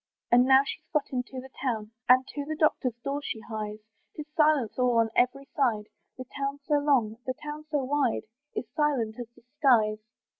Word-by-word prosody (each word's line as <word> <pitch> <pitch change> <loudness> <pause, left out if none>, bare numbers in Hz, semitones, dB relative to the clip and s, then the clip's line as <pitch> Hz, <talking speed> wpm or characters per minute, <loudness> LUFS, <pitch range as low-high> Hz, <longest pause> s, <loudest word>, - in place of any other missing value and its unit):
And 245 +1 +6
now 265 +1 +6
she's - - -7
got 300 -3 0
into 255 0 -3
the 260 +1 -11
town, 225 -5 -2 0.2
And 255 +1 +7
to 290 - -4
the 310 +2 -4
doctor's 300 -6 +1
door 280 +1 -2
she 230 - -4
hies; 215 -1 -5 0.4
Tis 300 - -6
silence 300 -7 +2
all 250 -2 +3
on 225 -1 +3
every 260 +3 +2
side; 225 -7 +1 0.3
The 255 - -7
town 275 0 -2
so 295 -2 +2
long, 255 -7 +2
the 255 - -1
town 300 +2 -7
so 295 -3 0
wide, 270 -2 0 0.3
Is - - -2
silent 255 -7 0
as 240 - -5
the 240 - -21 0.2
skies. 220 -7 +4
260 Hz, 190 wpm, -28 LUFS, 235-290 Hz, 0.4 s, And